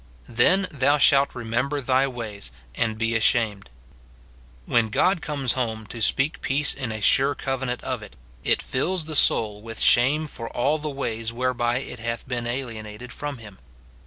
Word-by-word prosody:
"Then 185 +12 +3
thou 145 0 +2
shalt 140 -1 +4
remember 125 +5 -1
thy 130 0 +2
ways, 110 - -6 0.2
and 110 - -1
be 115 0 0
ashamed." 110 - +1 1.0
When 115 -2 +2
God 180 - +2
comes 140 -6 -1
home 110 -4 -2
to 115 - -7
speak 135 +7 +1
peace 140 +2 +1
in 130 -5 -4
a 110 - -4
sure 135 +7 +4
covenant 130 -2 -3
of 130 -3 -3
it, 105 - -12 0.3
it - - +2
fills 165 +6 -1
the 160 - -6
soul 105 -6 +3
Avith 115 0 -8
shame 140 +6 +4
for 115 -6 -7
all 145 +6 0
the 150 0 -4
ways 115 -5 -3
whereby 120 0 0
it 125 -3 -8
hath 115 +1 -4
been 120 -2 -3
alienated 120 -2 -6
from 145 -2 -5
him. 105 -4 -13
125 Hz, 165 wpm, -24 LUFS, 115-140 Hz, 1.0 s, shalt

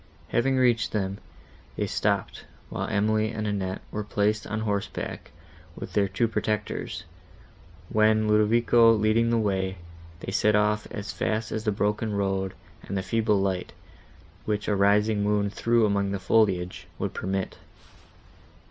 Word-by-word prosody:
Having 130 +2 +2
reached 120 -3 +2
them, 100 -2 -2 0.6
they - - -1
stopped, - - -1 0.3
while - - -3
Emily 110 0 +1
and 110 -1 -4
Annette 95 -3 -2
were 105 - -3
placed 105 +1 0
on 110 +1 -3
horseback 100 -2 -3 0.5
with - - -8
their 100 -1 +3
two 95 +5 0
protectors, 110 -1 -2 0.8
when, 110 +1 +3
Ludovico 115 +2 +5
leading 110 +2 +2
the 115 - +2
way, 95 -3 0 0.4
they - - -5
set 105 +1 +3
off 105 0 +1
as 105 0 -5
fast 110 0 -1
as 110 +1 -3
the 105 - +2
broken 105 +1 -1
road, 95 -1 -1 0.3
and 100 - -4
the 95 - -2
feeble 105 +1 +1
light, 95 -2 -2 0.7
which 105 -1 -1
a 105 - +2
rising 105 +2 +3
moon 100 -1 +1
threw 115 +1 +2
among 100 -1 +1
the 100 0 -2
foliage, 95 -3 +1
would - - -3
permit. 95 0 -3
105 Hz, 145 wpm, -26 LUFS, 100-110 Hz, 0.8 s, Ludovico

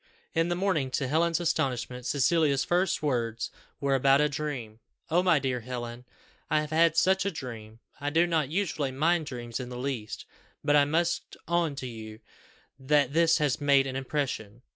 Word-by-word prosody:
In 165 +1 +1
the 175 - 0
morning, 175 -8 0
to 135 - -1
Helen's 165 +4 +2
astonishment, 125 -6 -1
Cecilia's 145 0 +2
first 175 -1 +1
words 115 -5 -1 0.3
were 140 -1 +1
about 135 +1 +4
a 150 - +4
dream 135 -7 -5 0.3
"Oh, 175 +2 +4
my 180 -3 +4
dear 130 -2 -1
Helen, 120 0 -6 0.4
I 155 - +3
have 150 0 -6
had 165 0 +3
such 190 +2 +3
a 200 - 0
dream! 115 - -8 0.2
I 145 +1 -1
do 165 +3 +3
not 160 -5 0
usually 160 -6 -1
mind 160 +4 +1
dreams 120 -2 -5
in 125 -1 -6
the 125 - -7
least, 125 -5 -4 0.4
but 145 0 +3
I 145 -1 +6
must 170 +4 -1
own 170 -4 +1
to 135 -2 -5
you 110 -2 -9 0.6
that 140 0 +2
this 165 0 +4
has 150 -3 0
made 140 -1 +4
an 130 -1 -4
impression! 130 -5 -3
140 Hz, 180 wpm, -28 LUFS, 125-165 Hz, 0.6 s, I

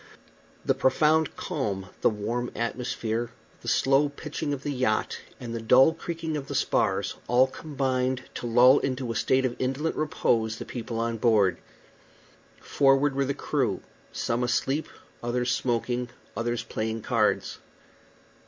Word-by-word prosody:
The - - +3
profound 155 +3 +2
calm, 95 -2 -3
the - - +5
warm 115 +3 -2
atmosphere, 115 -1 -2 0.3
the - - -11
slow 135 +2 +3
pitching 150 +1 -5
of 140 -1 -3
the 145 - -2
yacht, 125 -5 0 0.2
and 120 -2 -6
the 115 - -3
dull 130 +7 +6
creaking 165 -1 -4
of 140 -2 -4
the - - -5
spars - - +1
all 125 +2 +5
combined 130 -2 -2
to 120 - -5
lull 125 +4 +6
into 130 -2 -2
a - - -4
state 130 +4 +2
of 120 - -1
indolent 135 +5 -1
repose 115 -7 0
the - - -6
people 115 -2 -5
on 115 0 -1
board. 105 -5 +3 1.0
Forward 135 0 +3
were 140 0 +1
the 140 +1 -2
crew; - - -1 0.3
some 115 +1 -1
asleep, 135 +5 0 0.3
others 120 +1 0
smoking, 120 0 -1 0.3
others 120 0 -1
playing 110 0 -3
cards. - - +1
125 Hz, 145 wpm, -27 LUFS, 115-140 Hz, 1.0 s, dull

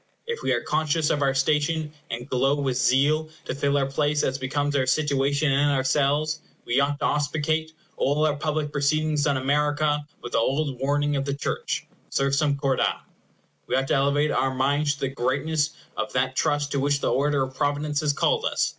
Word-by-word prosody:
If 470 0 -4
we - - 0
are - - 0
conscious 155 0 0
of 145 - 0
our 135 -1 +2
station, 150 +3 +1 0.2
and 120 +1 -5
glow 135 +2 +2
with 135 -3 0
zeal 140 +6 +2 0.2
to - - -3
fill 140 +1 +1
our 140 - +2
places 145 +2 0
as 130 - 0
becomes 145 +2 -1
our 130 -2 +1
situation 140 +1 +1
and 140 +2 +3
ourselves, 145 +3 +1 0.2
we 120 +3 +1
ought 140 +1 +1
to - - +1
auspicate 155 +2 0 0.3
all 145 +3 +2
our 150 -1 +1
public 150 0 -2
proceedings 150 +1 +1
on 140 -2 +2
America 145 +2 +1 0.2
with 120 - -6
the - - +2
old 135 +2 0
warning 145 +1 +1
of 135 - -1
the 140 0 -2
church, 140 - -3 0.2
Sursum 140 +1 +1
corda! 135 -2 +1 0.7
We - - 0
ought 135 +1 0
to - - +2
elevate 140 +2 +2
our 135 - +1
minds 145 +3 +1
to - - -16
the 135 - 0
greatness 145 +4 0 0.3
of 135 - -3
that 130 +1 0
trust 145 0 0
to 140 - 0
which 140 +1 +1
the - - 0
order 140 0 +2
of 130 0 -5
providence 145 +2 -1
has 150 -2 +1
called 450 - +1
us. - - +1
145 Hz, 195 wpm, -25 LUFS, 135-150 Hz, 0.7 s, and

